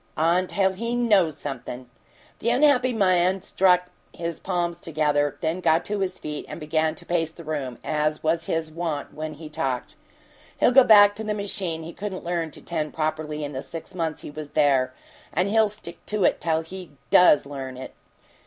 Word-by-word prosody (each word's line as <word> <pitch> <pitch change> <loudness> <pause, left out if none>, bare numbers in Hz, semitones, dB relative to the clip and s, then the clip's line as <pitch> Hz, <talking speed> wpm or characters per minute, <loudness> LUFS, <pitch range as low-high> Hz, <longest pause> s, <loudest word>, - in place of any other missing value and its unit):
"Until 185 +4 +2
he 230 +5 -3
KNOWS 200 -11 +3
something!" 125 -3 -6 0.5
The 230 - 0
unhappy 255 0 +4
man 185 -3 +2
struck 180 -2 +3 0.2
his 170 -1 -5
palms 175 -2 -2
together, 150 -2 0
then 165 +2 -1
got 165 -1 +3
to 210 0 -2
his 185 -1 -2
feet 150 -3 -6
and - - -7
began 155 0 0
to - - -12
pace 165 -2 0
the 170 +1 -12
room, 145 -6 -4
as 155 0 -1
was 165 +1 +1
his 160 -1 -2
wont 160 -3 -4
when 155 0 -5
he 155 +1 -9
talked. 135 -4 -3 0.6
"He'll - - +5
go 265 +1 +8
back 205 -2 +8
to 220 - -3
the 210 -1 -2
machine 195 -5 -2
he 165 +1 -8
couldn't 195 -2 -5
learn 170 -1 -2
to - - -12
tend 155 -3 -3
properly 155 -1 -2
in 145 - -4
the 130 -2 -4
six 165 +5 -8
months 165 -3 -3
he - - -7
was 150 0 -7
there, 135 -4 +3 0.4
and 180 +4 +1
he'll 220 0 +4
stick 185 -5 -11
to 210 -2 0
it - - +2
till 160 -1 +1
he 180 -1 -10 0.2
DOES 165 -6 +6
learn 135 -2 -7
it! 130 - -8
165 Hz, 190 wpm, -25 LUFS, 150-190 Hz, 0.6 s, go